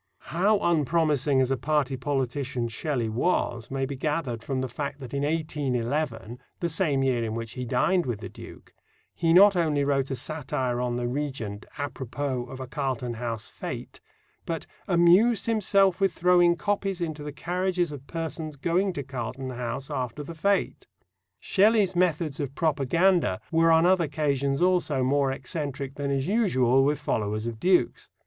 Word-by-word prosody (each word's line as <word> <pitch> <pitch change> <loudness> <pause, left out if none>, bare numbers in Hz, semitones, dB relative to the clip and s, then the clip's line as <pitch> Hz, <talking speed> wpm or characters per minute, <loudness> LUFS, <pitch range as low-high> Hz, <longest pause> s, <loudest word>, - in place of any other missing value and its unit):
How 200 +5 +3
unpromising 150 -4 +2
as 130 0 +1
a 135 - +1
party 140 0 0
politician 130 -2 -2
Shelley 125 0 -2
was 120 -1 -1
may 135 0 -1
be 140 +1 -5
gathered 140 -4 -2
from 130 +2 -2
the 130 - -2
fact 140 +4 -5
that 130 -2 -9
in 140 - -1
1811, 140 -5 -2 0.2
the 170 - -1
same 150 -5 +1
year 125 -3 +1
in 110 -1 -3
which 115 -1 -5
he 125 -1 -5
dined 135 +7 +1
with 120 -4 -2
the - - -6
Duke, - - -13 0.4
he 165 -1 +1
not 195 +3 +7
only 155 -5 +1
wrote 140 -1 +1
a 135 - -2
satire 130 -2 -2
on 125 -1 -1
the 120 0 -1
Regent 125 -6 -4
à 145 -1 -4
propos 130 -1 -4
of 130 - -8
a 130 - -4
Carlton 130 -3 -3
House 115 -2 -5
fête, - - -6 0.5
but 165 -1 -3 0.2
"amused 185 +5 +4
himself 200 -4 +2
with 195 -2 +3
throwing 175 -1 +4
copies 195 0 -1
into 160 -3 -3
the 150 0 -5
carriages 180 +2 -1
of 140 -2 -9
persons 160 -2 -5
going 175 +7 0
to 140 - -4
Carlton 130 0 -5
House 125 +2 -5
after 125 +3 -3
the 165 - -8
fête." 200 +5 0 0.5
Shelley's 205 -2 +3
methods 165 -4 +1
of 140 -2 -4
propaganda 160 - +2
were 165 0 +4
on 165 +1 +5
other 180 -2 +4
occasions 140 -1 0
also 175 -7 +2
more 135 +1 +2
eccentric 140 0 -4
than 140 0 -3
is 135 -1 0
usual 135 - +3
with 145 +2 +2
followers 105 0 -2
of 115 -2 -5
dukes. 180 -4 +2
145 Hz, 170 wpm, -26 LUFS, 130-170 Hz, 0.5 s, not